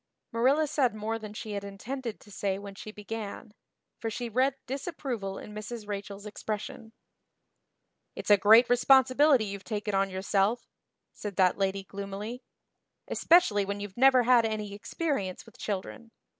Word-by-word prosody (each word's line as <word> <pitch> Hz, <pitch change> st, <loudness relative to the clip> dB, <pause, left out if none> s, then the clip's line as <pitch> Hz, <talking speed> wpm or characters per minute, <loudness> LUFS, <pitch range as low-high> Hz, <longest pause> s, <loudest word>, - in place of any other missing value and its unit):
Marilla 265 Hz, +7 st, +3 dB
said 265 Hz, -6 st, +1 dB
more 220 Hz, +1 st, -3 dB
than 215 Hz, -1 st, -8 dB
she 215 Hz, 0 st, -7 dB
had 200 Hz, -1 st, -3 dB
intended 225 Hz, +4 st, -6 dB
to 205 Hz, -, -16 dB
say 195 Hz, -1 st, -1 dB
when 200 Hz, 0 st, -8 dB
she 200 Hz, -, -9 dB
began, 210 Hz, 0 st, -7 dB, 0.5 s
for 225 Hz, -, -2 dB
she 235 Hz, +2 st, -4 dB
read 260 Hz, +4 st, +2 dB
disapproval 255 Hz, -, -4 dB
in 210 Hz, -, -9 dB
Mrs. 215 Hz, +1 st, -7 dB
Rachel's 200 Hz, 0 st, -6 dB
expression. 215 Hz, +1 st, -5 dB, 1.2 s
"It's -, -, -2 dB
a -, -, +10 dB
great 220 Hz, +5 st, +7 dB
responsibility 260 Hz, +1 st, +5 dB
you've 200 Hz, -1 st, -6 dB
taken 210 Hz, -1 st, -3 dB
on 195 Hz, 0 st, +2 dB
yourself," 195 Hz, +4 st, 0 dB, 0.5 s
said 205 Hz, -2 st, -6 dB
that 185 Hz, +1 st, +3 dB
lady 195 Hz, 0 st, 0 dB
gloomily, 200 Hz, +5 st, -6 dB, 0.7 s
"especially 325 Hz, -, +4 dB
when 200 Hz, +1 st, -4 dB
you've 205 Hz, -2 st, -7 dB
never 260 Hz, 0 st, +6 dB
had 240 Hz, -1 st, +5 dB
any 215 Hz, -2 st, -3 dB
experience 205 Hz, -, -3 dB
with 230 Hz, -, -18 dB
children. 215 Hz, +4 st, -5 dB
215 Hz, 150 wpm, -29 LUFS, 200-245 Hz, 1.2 s, a